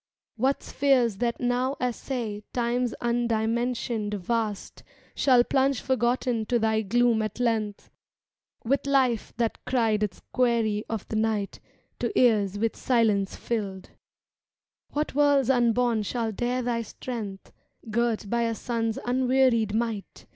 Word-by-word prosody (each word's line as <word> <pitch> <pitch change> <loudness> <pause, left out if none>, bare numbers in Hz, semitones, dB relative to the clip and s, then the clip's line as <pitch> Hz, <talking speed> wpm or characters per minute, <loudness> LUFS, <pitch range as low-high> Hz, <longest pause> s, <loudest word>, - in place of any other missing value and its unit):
What 260 +5 0
spheres 255 -7 +2
that 235 +2 -1
now 250 +2 0
assay 240 -3 -3
Time's 245 0 0
undimensioned 235 -2 0
vast 210 +1 -3 0.3
Shall 250 -3 +4
plunge 270 +1 +1
forgotten 245 -3 0
to 245 - +2
thy 220 -1 +1
gloom 235 +2 +2
at 215 +1 -4
length. 220 -4 -1 0.7
With 275 +3 0
life 260 -5 +2
that 230 -2 -1
cried 225 -4 +1
its 205 -4 -3
query 230 -4 +1
of 225 -3 -4
the 220 - -1
night 215 -2 -1 0.4
To - - -1
ears 205 -5 +3
with 225 +1 0
silence 215 -6 +1
filled! 200 -5 -3
^^ - - -19 1.0
What 300 +1 -2
worlds 280 -2 +4
unborn 240 -2 +2
shall 225 +2 -2
dare 245 +4 -1
thy 235 -1 -1
strength, 215 -3 -7 0.3
^y 225 - -8
Girt 230 -2 0
by 235 +3 0
a 230 -1 0
sun's 225 -1 -2
unwearied 250 -3 +2
might. 225 -4 -3
235 Hz, 135 wpm, -26 LUFS, 220-250 Hz, 1.0 s, Shall